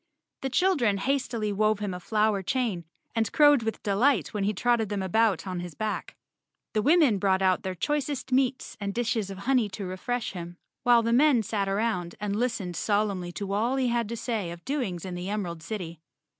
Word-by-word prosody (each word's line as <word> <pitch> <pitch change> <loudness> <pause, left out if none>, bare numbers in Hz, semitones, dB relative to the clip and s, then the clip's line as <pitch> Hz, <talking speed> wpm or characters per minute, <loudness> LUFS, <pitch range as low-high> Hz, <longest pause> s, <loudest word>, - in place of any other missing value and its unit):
The 270 - -2
children 265 - +2
hastily 230 -2 -1
wove 215 +1 +2
him 205 -2 -3
a 180 - -5
flower 210 +1 +1
chain 210 -5 -1 0.3
and 225 -2 +1
crowed 290 -3 +6
with 225 0 -4
delight 210 - +2
when 205 -2 -1
he 205 - +2
trotted 225 +1 +1
them 205 -2 -2
about 205 0 +2
on 185 -2 -3
his 175 -2 -7
back. 215 -1 -3 0.6
The 215 - +2
women 290 - +4
brought 190 0 +2
out 185 -1 +3
their 185 -1 -4
choicest 280 - -2
meats 260 0 +1
and 200 0 -3
dishes 230 -4 0
of 195 - -7
honey 235 +1 +1
to 195 +1 -6
refresh 220 +6 -3
him, 175 -1 -8 0.2
while 240 -1 +5
the 230 +1 +1
men 260 -2 +5
sat 205 -2 -1
around 195 -4 -1
and 205 -1 -2
listened 215 -6 -1
solemnly 200 -2 0
to 200 +1 -4
all 230 +6 +1
he 260 -2 +1
had 235 -2 0
to 235 - -4
say 220 -7 -2
of 170 0 -9
doings 240 - -2
in 185 - -5
the 180 +2 -4
Emerald 180 -6 -3
City. 170 -4 -6
215 Hz, 200 wpm, -27 LUFS, 190-240 Hz, 0.6 s, crowed